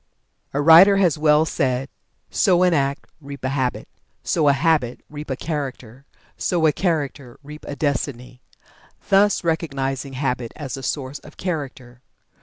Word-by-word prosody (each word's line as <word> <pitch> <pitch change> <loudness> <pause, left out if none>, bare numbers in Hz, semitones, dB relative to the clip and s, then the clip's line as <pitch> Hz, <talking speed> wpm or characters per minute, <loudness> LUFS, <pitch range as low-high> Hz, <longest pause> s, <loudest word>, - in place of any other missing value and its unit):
A 140 - -2
writer 165 +6 +8
has 175 -6 +2
well 150 0 +4
said: 135 -4 -1 0.4
"Sow 180 -2 +3
an 180 -1 +3
act, 140 -2 -1 0.2
reap 140 -1 -10
a 130 - 0
habit; 130 -2 -2 0.4
sow 155 -3 +1
a 140 - +6
habit, 140 -4 +1
reap 150 0 -8
a 130 - -1
character; 135 -4 -6 0.3
sow 170 -3 0
a 155 - +5
character, 145 -8 -3
reap 150 +2 -11
a - - -5
destiny," 130 -3 -3 0.7
thus 200 0 +3
recognizing 140 -5 -2
habit 125 -3 -3
as 145 -4 -7
the 135 - -5
source 135 0 -4
of 150 - -16
character. 135 -8 -5
140 Hz, 150 wpm, -22 LUFS, 130-160 Hz, 0.7 s, writer